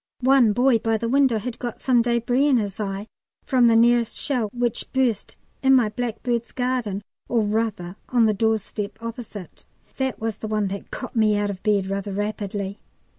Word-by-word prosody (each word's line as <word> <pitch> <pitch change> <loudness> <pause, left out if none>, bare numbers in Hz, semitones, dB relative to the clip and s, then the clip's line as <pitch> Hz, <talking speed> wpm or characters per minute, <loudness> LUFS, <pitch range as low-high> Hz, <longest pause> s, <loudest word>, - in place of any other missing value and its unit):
One 260 -3 +5
boy 245 +2 +3
by 225 0 +1
the 230 - -3
window 265 -2 +3
had 240 +2 -5
got 240 -2 -5
some 250 -3 +3
débris 240 +4 +2
in 265 - +4
his 205 -3 -3
eye 200 -1 -3 0.4
from 250 -3 +4
the 230 - +5
nearest 235 0 +4
shell, 245 -7 -1
which 240 -1 -2
burst 255 -5 0 0.3
in 265 0 +5
my 240 -5 +3
blackbird's 235 +1 -3
garden, 245 -6 -1 0.3
or 235 -2 +2
rather 210 -4 -2
on 240 -2 +4
the 215 - +3
doorstep 210 -1 -1
opposite. 230 -5 -8 0.3
(That 265 -1 -1
was 220 -2 -3
the 220 - -6
one 210 -2 0
that 200 +1 -6
got 255 - -7
me 215 -2 +3
out 205 0 0
of 190 -1 -8
bed 205 -3 +2
rather 195 +1 -3
rapidly.) 205 -1 -3
225 Hz, 180 wpm, -23 LUFS, 205-245 Hz, 0.4 s, One